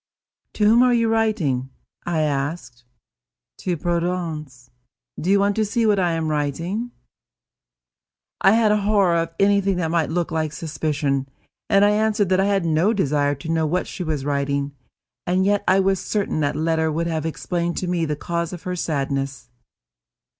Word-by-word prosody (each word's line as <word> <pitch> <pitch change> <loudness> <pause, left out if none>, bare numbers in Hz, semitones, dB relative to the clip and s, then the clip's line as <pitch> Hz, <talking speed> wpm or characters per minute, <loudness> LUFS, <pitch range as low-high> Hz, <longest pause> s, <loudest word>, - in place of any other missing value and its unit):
"To 210 - +1
whom 225 +3 +6
are 250 -1 +4
you 230 -1 +2
writing?" 200 - 0 0.4
I 170 -2 0
asked. 135 -4 -3 0.7
"To 180 -2 -2
Prudence. 165 -7 -3 0.5
Do 175 - -2
you 200 +1 +5
want 200 0 +2
to 220 - +3
see 225 +2 0
what 210 -2 +3
I 175 -2 +1
am 165 -1 -1
writing?" 165 - -2 1.5
I 195 - +6
had 225 -2 +4
a 210 - +3
horror 200 -4 +3
of 165 0 0
anything 200 -1 +3
that 165 -3 -1
might 165 -2 +1
look 170 +1 -1
like 155 -1 -1
suspicion, 145 -4 -2 0.4
and 200 +1 +5
I 205 - +4
answered 210 -2 +1
that 185 0 +3
I 195 - +3
had 200 -3 +1
no 165 +7 +2
desire 145 -7 +1
to 140 +4 -9
know 160 -1 +1
what 180 +4 0
she 185 - -6
was 155 -4 -3
writing; 140 0 -1 0.5
and 185 +2 +2
yet 205 0 +2
I 190 - +5
was 195 -1 +2
certain 205 -6 -1
that 145 -1 0
letter 160 0 0
would 165 +2 -1
have 160 -1 -2
explained 170 +1 -3
to 185 - -2
me 175 -2 0
the 150 -1 -2
cause 170 +2 -3
of 175 - -8
her 180 0 -3
sadness. 140 -5 -3
170 Hz, 175 wpm, -22 LUFS, 150-195 Hz, 1.5 s, whom